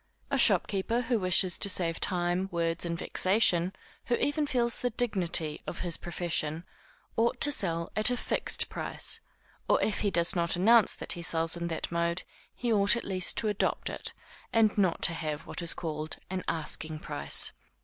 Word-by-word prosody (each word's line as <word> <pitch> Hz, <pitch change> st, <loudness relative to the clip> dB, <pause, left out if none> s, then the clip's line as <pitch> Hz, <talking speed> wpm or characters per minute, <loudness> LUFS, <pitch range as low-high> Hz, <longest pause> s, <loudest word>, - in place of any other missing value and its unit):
A -, -, +1 dB
shopkeeper 220 Hz, +4 st, +2 dB
who 235 Hz, -1 st, 0 dB
wishes 185 Hz, -1 st, +3 dB
to 200 Hz, -, +5 dB
save 170 Hz, -3 st, +1 dB
time, 180 Hz, +1 st, 0 dB
words 170 Hz, 0 st, -2 dB
and 170 Hz, 0 st, -3 dB
vexation, 185 Hz, -2 st, +3 dB, 0.3 s
who 240 Hz, -, +1 dB
even 295 Hz, +3 st, -1 dB
feels 240 Hz, -3 st, +1 dB
the 245 Hz, -, -1 dB
dignity 180 Hz, -10 st, +1 dB
of -, -, -5 dB
his 175 Hz, -2 st, +3 dB
profession, 170 Hz, -2 st, -1 dB, 0.5 s
ought 235 Hz, +2 st, +1 dB
to 290 Hz, -, +5 dB
sell 170 Hz, -9 st, -1 dB
at 215 Hz, +3 st, +3 dB
a 245 Hz, -, -1 dB
fixed -, -, 0 dB
price, -, -, -1 dB, 0.5 s
or -, -, +4 dB
if 215 Hz, -, -1 dB
he 205 Hz, -, +1 dB
does 170 Hz, -1 st, +4 dB
not 170 Hz, 0 st, +2 dB
announce 220 Hz, +4 st, +4 dB
that -, -, -4 dB
he 175 Hz, -, -7 dB
sells 165 Hz, +1 st, -1 dB
in 170 Hz, 0 st, -4 dB
that 165 Hz, -1 st, -4 dB
mode, 170 Hz, +1 st, -1 dB, 0.3 s
he 240 Hz, -2 st, -1 dB
ought 200 Hz, +1 st, +4 dB
at 235 Hz, -, -4 dB
least 185 Hz, -2 st, -1 dB
to 220 Hz, -, +2 dB
adopt 210 Hz, -1 st, -1 dB
it, -, -, -6 dB, 0.4 s
and 220 Hz, -2 st, +3 dB
not 190 Hz, -5 st, +1 dB
to 170 Hz, -, +3 dB
have 155 Hz, -2 st, -4 dB
what -, -, -7 dB
is 170 Hz, -, -1 dB
called 155 Hz, -2 st, -5 dB
an 185 Hz, -1 st, -3 dB
asking 155 Hz, -1 st, -1 dB
price. 145 Hz, -1 st, -1 dB
180 Hz, 180 wpm, -29 LUFS, 170-215 Hz, 0.5 s, to